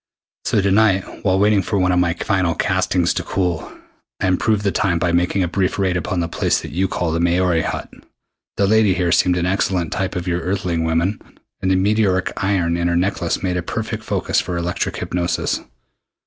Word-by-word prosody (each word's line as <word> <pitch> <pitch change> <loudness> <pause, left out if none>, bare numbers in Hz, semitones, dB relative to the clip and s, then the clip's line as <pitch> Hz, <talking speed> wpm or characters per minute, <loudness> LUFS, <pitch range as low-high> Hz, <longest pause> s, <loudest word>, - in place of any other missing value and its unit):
So 105 - +2
to 100 0 +1
night, 100 -2 +4 0.2
while 95 -1 +2
waiting 105 0 +3
for 100 - -2
one 90 -1 +2
of 90 - +2
my 85 -2 +1
final 95 -6 0
castings - - +1
to - - -2
cool, 90 -4 -2 0.5
I - - -1
improved 100 +3 +1
the 100 - +1
time 90 -3 +1
by 85 0 0
making 90 +2 +1
a - - 0
brief 95 +1 -1
raid 95 -2 +1
upon 90 +1 -1
the 85 - -1
place - - 0
that 80 - -8
you 95 +5 0
call 90 -2 -2
the 85 - -1
Maori 85 0 +2
Hut. - - -3 0.7
The 100 - +3
lady 105 -2 +3
here 90 -2 0
seemed 90 0 +3
an 85 - 0
excellent 90 -2 0
type 95 -2 -2
of 90 0 -4
your 85 0 0
Earthling 90 -2 -1
women, 85 +5 0 0.4
and 95 - 0
the 95 - +3
meteoric 95 -1 +1
iron 90 -4 0
in 85 0 0
her 85 - +1
necklace 90 -1 -1
made 90 -1 0
a - - -1
perfect - - -4
focus - - 0
for 90 -1 -4
electric 85 +1 -2
hypnosis. 90 -1 -1
90 Hz, 205 wpm, -20 LUFS, 85-95 Hz, 0.7 s, night